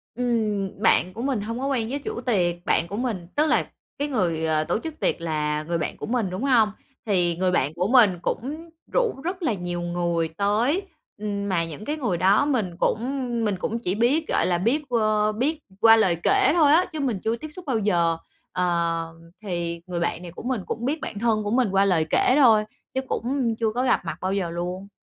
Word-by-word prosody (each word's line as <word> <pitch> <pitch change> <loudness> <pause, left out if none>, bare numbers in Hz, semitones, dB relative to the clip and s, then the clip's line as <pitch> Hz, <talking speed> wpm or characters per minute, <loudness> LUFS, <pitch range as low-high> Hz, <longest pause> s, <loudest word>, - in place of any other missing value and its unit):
Ừm. 215 -5 -1
Bạn 185 -2 +3
của 230 - -5
mình 260 -5 0
hông 230 +3 -4
có 270 - -2
quen 250 -5 0
với 280 - -1
chủ 435 +10 -5
tiệc, 180 -8 +1
bạn 165 - +2
của 200 - -5
mình 220 -7 -3
tức 300 +2 +3
là - - +1 0.3
cái 290 - -1
người, 170 - 0
ờ, 155 -1 +1
tổ 210 - 0
chức 315 +3 -7
tiệc - - 0
là 150 -2 -1
người 170 +2 -2
bạn 155 - -3
của - - -6
mình, 230 -5 0
đúng 185 +5 -4
hông? 240 -6 +4 0.4
Thì 175 -4 +2
người 185 +1 +1
bạn 145 -5 +1
của 180 +3 0
mình 220 -8 +5
cũng 310 +7 -4 0.2
rủ - - +2
rất 365 +2 -3
là 285 - +1
nhiều 175 -2 -4
người 175 -1 -1
tới, 210 - +1 0.4
ừm, 200 -1 -3
mà 175 -3 +1
những 165 +6 -8
cái 300 - -2
người 235 - -1
đó 195 +9 +3
mình 215 -12 -1
cũng - - +2 0.5
mình 205 -3 0
cũng 225 +5 -2
chỉ 185 -5 -1
biết, 260 +9 +2
gọi - - +2
là, 175 -1 +1
biết, 255 - +1
ờ, 215 -2 +2
biết 285 +9 -1 0.2
qua 225 0 +8
lời 190 -6 +3
kể 265 - +4
thôi 295 -3 +5
á, 345 +4 +5
chứ 310 - -4
mình 245 -9 -1
chưa 225 +1 +1
tiếp 310 +7 -8
xúc 360 +4 -10
bao 255 -5 +1
giờ. 170 -6 +2 0.4
Ờ, 170 -2 0 0.4
thì 170 -4 -3
người 175 -2 -3
bạn 170 +1 -1
này 175 - -8
của - - -9
mình 250 -1 -1
cũng 235 - -4
biết 300 +4 -1
bạn 205 - -6
thân 220 -2 +1
của 205 - -2
mình 245 -1 +2
qua 195 +1 +3
lời 165 -5 +2
kể 255 - +3
thôi, 220 -5 +6 0.3
chứ 265 - +1
cũng 245 -2 -1
chưa 225 -1 0
có 250 - 0
gặp 250 - +3
mặt 165 - -5
bao 185 +1 -1
giờ 190 -4 -1
luôn. 180 +3 -4
210 Hz, 230 wpm, -24 LUFS, 175-250 Hz, 0.5 s, qua